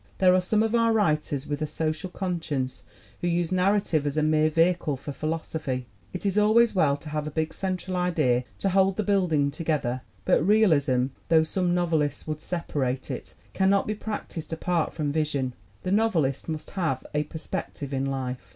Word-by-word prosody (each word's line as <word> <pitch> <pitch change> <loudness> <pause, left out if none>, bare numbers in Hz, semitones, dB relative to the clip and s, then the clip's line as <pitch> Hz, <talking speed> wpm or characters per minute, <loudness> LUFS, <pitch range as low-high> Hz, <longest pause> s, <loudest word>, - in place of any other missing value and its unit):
There 185 -1 +5
are 185 - +4
some 215 +4 +2
of 225 0 0
our 230 -1 +4
writers 155 -9 +1
with 145 0 -3
a 155 - 0
social 155 +3 -2
conscience 165 -9 -3 0.4
who 175 - -1
use 175 0 0
narrative 185 -5 +2
as 145 +1 -2
a 155 - +3
mere 155 0 +3
vehicle 165 -2 +2
for 140 +2 -7
philosophy. 155 -4 -3 0.3
It 180 - -5
is 200 +1 +2
al 210 +1 +3
ways 235 0 +5
well 150 -7 +3
to 150 +2 -10
have 150 0 -2
a - - -1
big 160 +1 -2
central 185 -1 -3
idea 155 -9 +2
to 195 - 0
hold 190 0 +3
the 215 - +1
build 195 -3 +2
ing 145 -2 +2
together, 140 -6 -1 0.2
but - - +4
realism 150 - +3 0.2
though 160 -1 +6
some 175 +2 0
novelists 160 -5 0
would 155 -1 -3
separate 135 -7 -2
it - - -7 0.2
cannot 195 +1 +3
be 215 - -1
practiced 205 -7 -6
apart 165 0 0
from 150 -3 -2
vision. 145 -4 -1 0.3
The 185 - -2
novelist 175 -11 +1
must 155 -1 -5
have 160 -9 -1
a 150 0 0
perspective 145 -2 -5
in 135 0 0
life. 130 -2 -3
160 Hz, 190 wpm, -26 LUFS, 145-185 Hz, 0.4 s, though